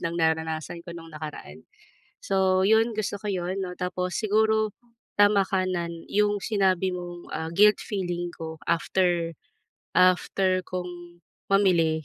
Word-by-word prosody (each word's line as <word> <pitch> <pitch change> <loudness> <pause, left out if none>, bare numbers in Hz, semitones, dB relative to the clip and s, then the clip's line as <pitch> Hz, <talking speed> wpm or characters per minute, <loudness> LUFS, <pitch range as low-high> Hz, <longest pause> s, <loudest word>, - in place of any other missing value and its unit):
ng 170 0 -2
naranasan 160 +1 -1
ko - - -7
no'ng 165 -1 -11
nakaraan. 150 - -8 0.6
So 190 -1 +2
'yon, 225 +1 +4
gusto 205 -1 -2
ko 210 - -5
'yon, 185 0 -2
no, 180 -1 -5
tapos 180 0 -3
siguro, 220 0 +2 0.5
tama 205 -1 +5
ka 185 -1 +1
nan 170 -2 -2 0.2
'yong 205 0 +2
sinabi 190 -4 +2
mong, 175 -1 -8
ah, 160 0 -3
guilt 210 +3 +6
feeling 175 -4 -3
ko 160 -1 -7
after 170 0 +1 0.6
after 185 +1 +3
kong 175 -1 -7 0.3
mamili, 170 -6 +3
180 Hz, 135 wpm, -26 LUFS, 170-195 Hz, 0.6 s, guilt